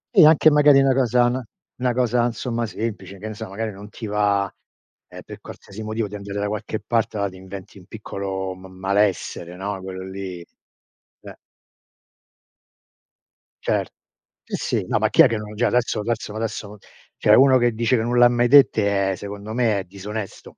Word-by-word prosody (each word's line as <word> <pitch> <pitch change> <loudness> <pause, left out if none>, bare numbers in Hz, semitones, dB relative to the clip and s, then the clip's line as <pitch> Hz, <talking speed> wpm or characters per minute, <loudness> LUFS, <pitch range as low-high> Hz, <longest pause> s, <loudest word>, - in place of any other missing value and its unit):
E 160 -6 +9
anche 155 0 +6
magari 145 -1 +6
una 135 -1 +4
cosa 125 -2 +3
n 130 +2 -1 0.4
una 125 -1 +1
cosa 120 -1 +1
insomma 120 -1 -3
semplice, 105 -3 -5
che 105 +3 -7
ne 110 - -5
so 105 - -8
magari 110 +2 -4
non 100 +2 -11
ti 110 - -8
va, 100 -1 +1 0.6
ehm, - - -11
per - - -11
qualsiasi 100 +3 -11
motivo 110 0 -3
di 100 - -14
andare 100 0 -6
da 100 - -1
qualche 105 +1 -4
parte 110 0 -1
ma 100 0 0
ti 95 - -13
inventi 95 +1 -10
un 90 - -17
piccolo 95 -3 -5
m 95 +1 -13
malessere, 95 -2 -1
no, 95 0 -5
quello 95 0 -7
lì, 95 -2 -6 0.8
eh. - - -11 2.3
Cer - - 0 0.6
sì, - - -4 0.2
sì, - - -2
no, - - +2
ma - - +2
chi - - +5
è - - +8
che 115 - -2
non 105 0 -8
già 120 +3 +1
adesso 120 -3 0
adesso 110 -1 -3
adesso 110 -2 -5 0.4
cioè - - +3
uno 130 0 +7
che 120 -1 +2
dice 115 +3 +1
che 110 - +1
non 120 +1 0
l'ha 120 0 +8
mai 120 0 +1
dette 100 -8 +4
è 95 - -2
secondo 100 +2 -7
me 115 -4 +1
è - - -4
disonesto 100 +2 -8
105 Hz, 185 wpm, -22 LUFS, 100-120 Hz, 2.3 s, E